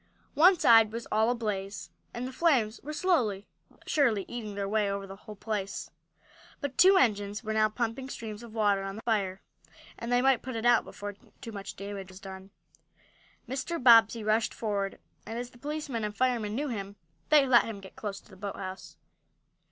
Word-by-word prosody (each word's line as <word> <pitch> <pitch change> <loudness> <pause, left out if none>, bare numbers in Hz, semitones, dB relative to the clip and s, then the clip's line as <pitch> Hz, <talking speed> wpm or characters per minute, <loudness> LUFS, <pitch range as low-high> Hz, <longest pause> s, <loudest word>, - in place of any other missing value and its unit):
One 360 +4 +6
side 225 -6 +6
was 230 +1 -5
all 220 +2 +3
ablaze, 210 -4 -3 0.2
and 245 +1 -4
the - - -6
flames 250 -8 +2
were 300 - -6
slowly, 255 - +1 0.2
but - - -25
surely, 235 -10 +2
eating 215 -4 -6
their 200 -1 -2
way 210 0 +1
over 200 0 -3
the 195 0 -9
whole 210 +1 -11
place. 205 -2 -4 0.7
But 285 -3 -4
two 380 +2 +7
engines 205 - +1
were 220 -1 -2
now 215 0 +3
pumping 235 +4 -3
streams 220 -4 -7
of 235 -2 -11
water 205 -3 +2
on 195 0 -5
the 220 - -9
fire, 195 -5 -1 0.6
and 235 +1 -4
they 245 +1 +3
might 265 -3 +4
put 255 -1 -6
it 225 +1 -3
out 240 -1 +5
before 205 0 -7 0.3
too 230 - -8
much 200 -2 -7
damage 200 -1 -7
was 185 0 -12
done. 190 0 -10 1.0
Mr. 270 +6 -3
Bobbsey 230 -3 +6
rushed 215 +1 +1
forward, 200 -3 -2 0.3
and, 225 +1 -5
as 245 0 -5
the 245 - -18
policemen 285 -4 -4
and 210 0 -4
firemen 235 -5 0
knew 290 +3 -2
him, 200 -4 -5 0.3
they 300 -2 +6
let 250 -2 +5
him 220 -3 -6
get 190 -1 -13
close 200 -2 -5
to - - -23
the - - -13
boathouse. 190 -1 -7
220 Hz, 190 wpm, -29 LUFS, 200-245 Hz, 1.0 s, two